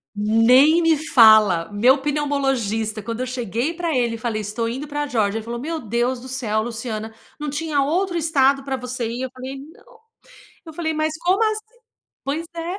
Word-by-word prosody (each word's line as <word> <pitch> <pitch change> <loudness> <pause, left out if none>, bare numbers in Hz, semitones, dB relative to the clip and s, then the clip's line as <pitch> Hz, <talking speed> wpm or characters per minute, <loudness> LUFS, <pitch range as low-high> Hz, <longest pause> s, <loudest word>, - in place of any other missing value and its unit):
Nem 230 +9 +5
me 325 -1 +4
fala! 220 - +5
Meu 245 +7 +4
pneumologista 270 -7 -1
quando 230 +4 -5
eu - - -1
cheguei 245 - -2
pra 335 -4 -2
ele 240 -2 0
e 230 - -4
falei: 220 -1 -3
"Estou 215 +3 -3
indo 265 +6 -5
pra 290 0 -3
Geórgia", 220 -5 0
ele - - -9
falou: 235 +1 -5
"Meu 320 +5 -4
Deus 240 +1 -1
do 255 - -11
céu, 235 -5 -1
Luciana, 225 -1 -5 0.3
não 300 -1 -3
tinha 295 -1 -1
outro 350 +6 0
estado 280 -4 +2
pra 270 -1 -3
você 250 -2 -4
ir?" 240 +3 -4
eu 260 - -5
falei: 260 +1 -7
"Não". 470 +6 -21 0.7
Eu 320 - -9
falei: 320 0 -2
"Mas, 310 0 -1
como 365 +4 +2
assim?" 435 +2 -3 0.5
Pois 295 +4 -3
é. 340 +3 -4
260 Hz, 190 wpm, -21 LUFS, 230-310 Hz, 0.7 s, Nem